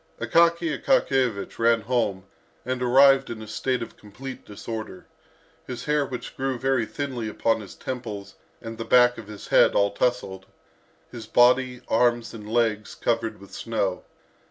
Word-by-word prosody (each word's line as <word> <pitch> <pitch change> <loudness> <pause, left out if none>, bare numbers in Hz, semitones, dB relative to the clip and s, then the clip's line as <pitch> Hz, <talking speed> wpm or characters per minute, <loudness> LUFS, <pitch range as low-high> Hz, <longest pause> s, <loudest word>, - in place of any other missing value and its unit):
Akaky 170 -2 +3
Akakiyevich 130 - +1
ran 115 0 +3
home 105 -5 -1 0.4
and 130 0 -2
arrived 135 +2 +5
in 115 -2 -6
a 110 - -8
state 125 +4 -1
of - - -11
complete 125 +6 -9
disorder, 110 +2 -7 0.6
his 125 - -6
hair 150 -1 +1
which 125 -2 -7
grew 135 -1 -2
very 130 -3 0
thinly 130 -5 -4
upon 115 +1 0
his 100 - -11
temples 105 -6 -6 0.3
and 115 0 -7
the - - -2
back 125 0 +4
of 110 - -10
his 105 -1 -10
head - - +5
all 100 0 +3
tousled, 100 -5 -1 0.7
his 115 -3 -9
body, 125 +1 +3
arms 120 0 +1
and 105 -1 -9
legs, 110 -3 0
covered 115 -1 -1
with 100 0 -14
snow. 100 -5 -2
120 Hz, 155 wpm, -25 LUFS, 110-130 Hz, 0.7 s, arrived